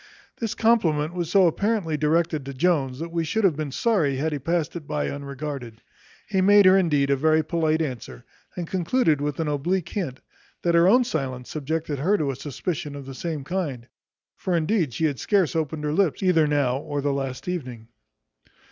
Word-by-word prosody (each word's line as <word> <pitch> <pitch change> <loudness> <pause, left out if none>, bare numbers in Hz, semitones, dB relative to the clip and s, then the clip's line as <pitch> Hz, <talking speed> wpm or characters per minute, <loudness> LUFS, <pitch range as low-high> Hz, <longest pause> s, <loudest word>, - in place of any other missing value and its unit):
This 225 -3 -3
compliment 170 -9 +2
was 175 -2 -3
so 190 0 +5
apparently 195 -1 0
directed 155 0 +1
to 140 - -6
Jones, 140 -4 +1
that 165 +3 -6
we 170 -1 -1
should 220 +8 -1
have 185 -6 +4
been 150 -2 -4
sorry 165 - +1
had 155 +4 -1
he 145 - -2
passed 165 +4 -1
it 160 -4 -7
by 150 -1 -2
unregarded. 140 -4 -6 0.5
He 195 -3 +1
made 205 +1 +6
her 185 +1 +7
indeed 150 -7 +2
a - - +4
very 155 +3 +3
polite 160 0 +1
answer, 120 - -7 0.3
and 175 - -2
concluded 175 - +1
with 145 0 -2
an 160 - -1
oblique 155 +5 -1
hint, 160 -11 -4 0.4
that 170 - +2
her 170 +1 +5
own 245 +6 +6
silence 130 - -4
subjected 155 -1 -3
her 190 +9 +2
to 145 -6 0
a - - -6
suspicion 145 +2 -4
of 140 -1 -8
the 135 - -8
same 155 +1 -4
kind: 145 -8 -3 0.5
for 185 - -1
indeed 165 - +1
she 160 - -1
had 140 -5 -1
scarce 190 - +1
opened 155 -1 -2
her 150 0 -1
lips 190 0 +1
either 165 -5 +4
now 140 -3 +1
or 145 -1 -4
the 145 0 0
last 135 0 -4
evening. 125 -11 -5
155 Hz, 195 wpm, -24 LUFS, 140-175 Hz, 0.5 s, her